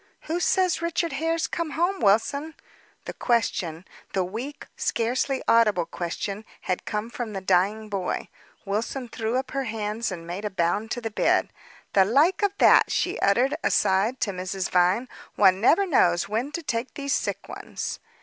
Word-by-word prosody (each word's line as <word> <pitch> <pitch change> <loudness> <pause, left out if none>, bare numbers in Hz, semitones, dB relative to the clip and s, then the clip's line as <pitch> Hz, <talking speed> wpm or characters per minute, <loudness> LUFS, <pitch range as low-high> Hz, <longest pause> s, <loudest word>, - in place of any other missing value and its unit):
"Who 330 +2 -2
says 365 -1 +2
Richard 335 0 -1
Hare's 325 +3 0
come 330 -3 -3
home, 360 +4 +1
Wilson?" 280 +10 +2 0.5
The - - -5
question 185 -8 -1 0.3
the 190 - +1
weak, 235 +11 -6
scarcely 255 +3 -1
audible 210 -7 +4
question 185 +5 -4 0.2
had 185 - -2
come 210 +2 -3
from 235 -3 -5
the 195 - -3
dying 195 +3 +1
boy. 195 -3 -3 0.4
Wilson 230 +5 -3
threw 225 +1 -2
up 265 0 -3
her 275 0 -2
hands, 215 0 -3
and 170 -2 -6
made 175 +4 -5
a 210 - -1
bound 190 +4 0
to 245 - -3
the 225 -1 -4
bed. - - +2 0.4
"The 195 - +6
like 285 - +3
of 405 -1 +1
that!" - - +6
she - - -1
uttered, 245 +8 +3
aside 205 +6 +2
to 200 - +1
Mrs. 185 0 -4
Vine. 185 +7 +3 0.3
"One 190 -1 +4
never 365 - +5
knows 175 - +3
when 230 +7 -2
to 340 - -4
take 235 -2 -3
these 280 -1 -2
sick - - -2
ones. - - -6
225 Hz, 170 wpm, -25 LUFS, 195-275 Hz, 0.5 s, The